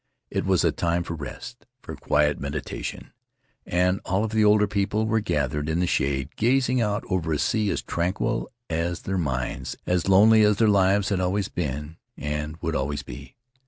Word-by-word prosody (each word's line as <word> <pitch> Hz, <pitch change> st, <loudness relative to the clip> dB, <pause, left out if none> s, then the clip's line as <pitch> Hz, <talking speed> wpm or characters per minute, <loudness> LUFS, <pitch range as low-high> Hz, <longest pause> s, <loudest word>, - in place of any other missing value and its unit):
It -, -, -1 dB
was -, -, +3 dB
a -, -, +3 dB
time 85 Hz, 0 st, 0 dB
for 85 Hz, -, -5 dB
rest, 75 Hz, -5 st, -8 dB, 0.2 s
for -, -, -7 dB
quiet 75 Hz, 0 st, +1 dB
meditation, 70 Hz, +1 st, -5 dB, 0.5 s
and 90 Hz, +2 st, +1 dB
all 95 Hz, +3 st, 0 dB
of 110 Hz, -, -2 dB
the 110 Hz, -1 st, +2 dB
older 105 Hz, 0 st, +5 dB
people 105 Hz, +1 st, 0 dB
were 110 Hz, 0 st, +1 dB
gathered 75 Hz, -, -1 dB
in 80 Hz, +2 st, 0 dB
the 90 Hz, -, +2 dB
shade, 70 Hz, -5 st, -1 dB
gazing 125 Hz, +1 st, +2 dB
out 105 Hz, -1 st, 0 dB
over 90 Hz, -4 st, -1 dB
a 75 Hz, -, +1 dB
sea 110 Hz, +5 st, +1 dB
as -, -, -2 dB
tranquil 95 Hz, +7 st, -1 dB, 0.2 s
as 85 Hz, +1 st, -2 dB
their 95 Hz, -1 st, -1 dB
minds, 65 Hz, -6 st, -3 dB
as 90 Hz, +1 st, 0 dB
lonely 110 Hz, +3 st, +6 dB
as 105 Hz, -1 st, +4 dB
their 110 Hz, -, +4 dB
lives 100 Hz, 0 st, +3 dB
had 100 Hz, -2 st, 0 dB
always 95 Hz, +2 st, 0 dB
been 75 Hz, 0 st, -4 dB, 0.2 s
and 75 Hz, +2 st, -4 dB
would 80 Hz, -1 st, -1 dB
always 70 Hz, +2 st, -2 dB
be. -, -, -10 dB
90 Hz, 185 wpm, -25 LUFS, 75-105 Hz, 0.5 s, lonely